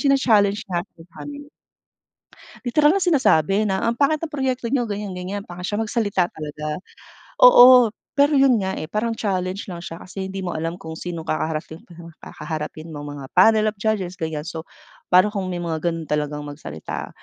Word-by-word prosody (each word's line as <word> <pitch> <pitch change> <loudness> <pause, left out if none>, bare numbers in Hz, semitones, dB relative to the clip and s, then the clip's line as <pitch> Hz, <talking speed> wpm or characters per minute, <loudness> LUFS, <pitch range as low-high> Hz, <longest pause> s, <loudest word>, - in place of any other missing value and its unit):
china-challenge 220 -8 +2
nga 175 0 -2
po 185 - -26 0.2
kami. 290 0 -9 1.1
Literal 295 +7 +4
na 395 - 0
sinasabi 215 - +3
na, 190 -1 -1
"Ang 235 +1 0
pangit 300 +2 +2
ng 330 - -4
proyekto 260 -4 -2
niyo, 255 -3 +1
ganyan, 205 -1 -4
ganyan." 195 +3 -4
Pangit 180 -1 -8
siya 210 +2 -1
magsalita 205 -5 0
talaga. 150 0 -5 0.6
Oo. 250 - +8 0.2
Pero 290 +1 +3
yun 265 -5 +4
nga, 190 0 -2
eh, - - -4
parang 225 +1 -1
challenge 190 -1 -2
lang 170 - -7
siya 165 -1 -7
kasi 190 +1 -6
hindi 190 0 -5
mo 175 - -3
alam 165 +2 -3
kung 160 -3 -9
sinong 170 -2 -5
kakaharaping 155 +1 -3
pang 170 -1 -12
kaharapin 155 0 -7
mong 145 0 -7
mga 140 - -8
panel 215 +4 +5
of 210 - -34
judges, 195 -5 -2
ganyan. 155 -2 -3
So, 165 -1 -7 0.4
pa'no 185 +3 +5
kung 195 -3 -3
may 180 - -3
mga 160 -2 -3
gano'n 165 -1 -2
talagang 150 0 -2
magsalita. 145 - -7
190 Hz, 180 wpm, -22 LUFS, 165-230 Hz, 1.1 s, Oo